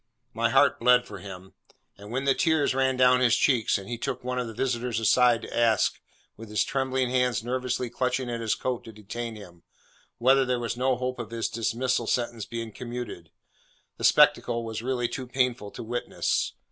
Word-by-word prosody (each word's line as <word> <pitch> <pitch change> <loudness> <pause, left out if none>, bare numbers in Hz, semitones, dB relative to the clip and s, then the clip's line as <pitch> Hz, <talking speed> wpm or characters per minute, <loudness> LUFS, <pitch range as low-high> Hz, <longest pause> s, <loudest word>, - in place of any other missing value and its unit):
My - - +1
heart - - +4
bled 125 +1 +4
for 100 -4 -9
him; 95 -1 -10 0.4
and 100 +1 -12
when 130 +4 -2
the 135 - +4
tears 160 -2 +2
ran 130 0 +1
down 125 0 +5
his 120 -2 +4
cheeks, 120 -6 +2
and 100 -1 -9
he 120 0 -5
took 125 - -4
one 125 0 -2
of 125 - -2
the 115 - -7
visitors 120 -2 -1
aside, 120 +1 +4
to - - -7
ask, 115 -3 +2 0.3
with 115 -1 -11
his 105 -1 +1
trembling 130 0 -1
hands 125 -3 +1
nervously 125 0 -2
clutching 125 +1 -1
at 120 -1 -3
his 110 -1 0
coat 125 -2 -3
to 115 - -9
detain 110 +2 -6
him, 90 -5 -13 0.6
whether 135 +3 +4
there 125 -1 0
was 120 -1 -3
no 130 +1 +1
hope 125 0 -4
of 115 -3 -5
his 115 -1 -2
dismal 115 +1 -1
sentence 120 -3 -1
being 115 0 -6
commuted, 120 -8 -7 0.7
the - - -8
spectacle 115 -1 +4
was 110 -1 -5
really 120 -1 -1
too 130 +1 -6
painful 125 -4 0
to - - -8
witness. 120 +2 -1
120 Hz, 195 wpm, -26 LUFS, 115-125 Hz, 0.7 s, down